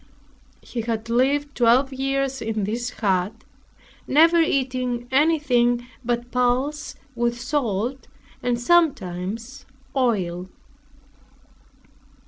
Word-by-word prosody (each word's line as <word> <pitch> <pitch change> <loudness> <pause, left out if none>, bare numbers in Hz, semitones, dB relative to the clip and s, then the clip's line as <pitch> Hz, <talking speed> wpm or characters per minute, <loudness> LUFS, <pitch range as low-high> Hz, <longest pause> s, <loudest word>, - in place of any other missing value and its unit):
He 240 - -4
had 225 0 -3
lived 280 +4 +1
twelve 250 +3 +3
years 270 0 -1
in 220 -2 -2
this 235 +4 -2
hut, 200 -1 -1 0.6
never 330 +4 +5
eating 255 -5 0
anything 260 -5 +2 0.2
but 240 0 -2
pulse 255 +4 0 0.2
with 240 0 -1
salt, 245 -1 -2 0.3
and 245 -1 0
sometimes 230 - 0 0.3
oil. 190 -8 0
245 Hz, 90 wpm, -23 LUFS, 230-270 Hz, 0.6 s, never